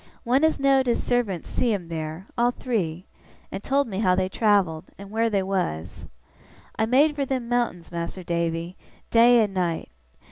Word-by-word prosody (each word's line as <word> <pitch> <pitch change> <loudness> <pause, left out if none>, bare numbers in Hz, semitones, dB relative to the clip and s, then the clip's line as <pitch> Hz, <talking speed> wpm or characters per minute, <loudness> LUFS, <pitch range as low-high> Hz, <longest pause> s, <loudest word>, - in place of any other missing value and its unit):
One 260 +4 +2
as 315 -2 +3
know'd 270 -1 +3
his 240 - +1
servant 225 -9 -1
see 245 - 0
'em 180 -4 -7
there, 160 +2 -5
all 240 +1 +3
three, 190 -9 -3 0.5
and 195 - -6
told 280 0 +1
me 195 -3 -4
how 185 -4 +3
they 185 0 0
travelled, 190 -6 +1
and 200 0 -11
where 225 +1 +1
they 200 -3 +1
was. 90 - -3 0.7
I 220 - 0
made 290 +5 +4
fur 285 - -1
them 255 -3 -2
mountains, 235 -9 -1
Mas'r 170 +2 -5
Davy, 170 +1 -2 0.4
day 235 0 +6
and 205 -2 -3
night. 175 -3 -1
200 Hz, 175 wpm, -24 LUFS, 175-245 Hz, 0.7 s, day